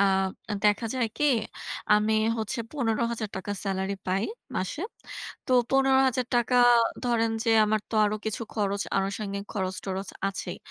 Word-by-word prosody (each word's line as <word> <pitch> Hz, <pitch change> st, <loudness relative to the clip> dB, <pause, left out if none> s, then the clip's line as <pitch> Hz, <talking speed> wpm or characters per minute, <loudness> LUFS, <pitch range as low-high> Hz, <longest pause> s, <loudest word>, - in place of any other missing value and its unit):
আ -, -, +6 dB, 0.6 s
দেখা 210 Hz, +2 st, +3 dB
যায় 250 Hz, -3 st, +1 dB
কি? 295 Hz, -, +2 dB, 0.7 s
আমি 210 Hz, +1 st, +2 dB, 0.3 s
হচ্ছে 220 Hz, +3 st, -2 dB
৳১৫০০০ 225 Hz, -6 st, -1 dB
স্যালারি 195 Hz, 0 st, -1 dB
পাই 190 Hz, +3 st, +1 dB, 0.3 s
মাসে। 185 Hz, -, -2 dB, 0.6 s
তো -, -, 0 dB, 0.2 s
৳১৫০০০ 260 Hz, -2 st, +3 dB, 0.5 s
ধরেন 230 Hz, -2 st, +2 dB
যে 230 Hz, -, +2 dB
আমার 215 Hz, 0 st, +1 dB
তো -, -, -4 dB
আরও 210 Hz, +1 st, +1 dB
কিছু 220 Hz, +1 st, -2 dB
খরচ 200 Hz, -2 st, 0 dB, 0.2 s
আনুষঙ্গিক 200 Hz, +1 st, -2 dB
খরচ-টরচ 190 Hz, -1 st, -3 dB, 0.2 s
আছেই। 195 Hz, -, -5 dB
215 Hz, 125 wpm, -27 LUFS, 195-240 Hz, 0.7 s, আ